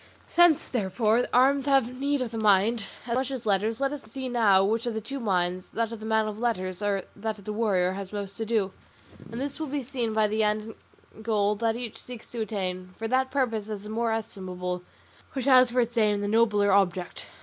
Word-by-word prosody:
Since, 345 -3 +4
therefore, 220 +1 +1
arms 270 +2 +4
have 260 -3 +2
need 280 -1 +1
of 235 - -5
the 225 - -4
mind, 215 +2 +3 0.2
as 235 - -2
much 260 +2 0
as 260 -4 -5
letters, 215 +3 +1
let 275 +1 0
us 290 - -6
see 255 +4 -6
now 210 -6 +4
which 225 +4 0
of 235 - -2
the - - -1
two 270 +6 -6
minds, 185 -4 0
that 230 0 -1
of 230 - -6
the 220 - -7
man 220 -1 +2
of 215 0 -5
letters 185 -6 -2
or 200 -2 0
that 215 +1 -3
of 200 - -15
the 210 - -3
warrior, 195 -5 +1
has 190 0 -6
most 200 -1 -5
to 225 - -2
do; 210 -4 0 0.6
and 230 - -5
this 280 +2 -4
will 315 - -3
be 285 0 -3
seen 245 -3 -2
by 215 0 +2
the 215 +1 0
end 215 +1 -1 0.4
and 220 - -13
goal 210 -2 +2
that 225 0 0
each 235 -2 -6
seeks 245 -3 -10
to 235 - -4
attain; 185 -4 -4
for 225 - -3
that 260 +2 +1
purpose 230 -6 -1
is 205 -2 -5
the 210 - -8
more 230 +1 0
estimable 185 -5 -4 0.5
which 265 -3 -2
has 255 -2 +7
for 250 +1 +2
its 235 +1 -2
aim 210 -3 +2
the 205 - -1
nobler 210 -2 +3
object. 185 -2 +1
220 Hz, 225 wpm, -27 LUFS, 205-245 Hz, 0.6 s, has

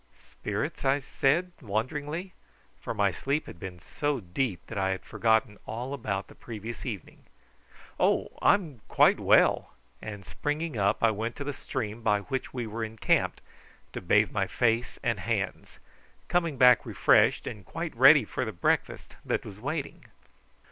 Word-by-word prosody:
"Spirits?" - - -4
I 135 +1 +3
said 150 +6 +1
wonderingly, 145 - -3 0.5
for - - -5
my 100 -3 +2
sleep 140 +9 -1
had 85 - -11
been 90 -1 -7
so 145 - -2
deep 95 0 -3
that 115 - -7
I 95 0 +1
had 95 0 -3
forgotten 110 -2 +1
all 125 +4 -4
about 100 -7 -3
the - - -14
previous 115 +2 -7
evening. 105 -8 -7 0.7
"Oh, - - +2
I'm 160 - +2
quite - - +4
well;" - - +3 0.3
and 105 -3 -7
springing 150 - -3
up 100 0 +1
I 115 - +5
went 110 +3 -3
to 145 - -5
the 145 0 -3
stream 120 -5 -5
by 105 -2 +2
which 130 +5 -4
we 125 -2 -4
were 110 +1 -4
encamped 110 0 0 0.5
to - - -5
bathe - - +3
my - - 0
face 115 0 0
and - - 0
hands, - - -3 0.5
coming 170 -5 +1
back 125 0 +7
refreshed, - - +3
and 105 - -6
quite 165 - -5
ready 135 +1 +7
for 130 - -3
the 110 - -3
breakfast 85 - -1
that - - -1
was 100 -1 -9
waiting. 145 +5 -4
120 Hz, 160 wpm, -28 LUFS, 105-140 Hz, 0.7 s, back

